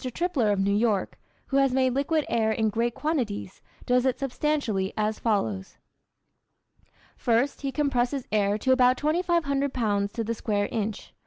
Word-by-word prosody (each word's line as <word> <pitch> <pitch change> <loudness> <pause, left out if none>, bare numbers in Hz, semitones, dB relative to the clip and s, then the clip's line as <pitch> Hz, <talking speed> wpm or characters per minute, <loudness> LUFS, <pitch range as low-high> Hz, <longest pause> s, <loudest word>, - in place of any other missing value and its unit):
Tripler 325 - +1
of 200 - 0
New 200 +1 +2
York, 210 -3 0 0.3
who 275 - +1
has 270 -2 +3
made 260 -1 +2
liquid 295 +3 0
air 220 -1 +1
in 220 0 +1
great 235 +2 -1
quantities, 240 - -3 0.2
does 250 0 +3
it 260 -1 +1
substantially 270 -8 -1
as 215 0 -1
follows: 110 - -1 1.4
First, 240 +4 0
he 275 -1 -2
compresses 270 -2 0
air 205 -1 +2
to 260 +5 0
about 255 -1 +4
2500 305 -4 0
pounds 205 -5 0
to 230 -1 -2
the 230 +1 -2
square 205 -3 -1
inch. 215 -2 -4
240 Hz, 155 wpm, -26 LUFS, 210-275 Hz, 1.4 s, about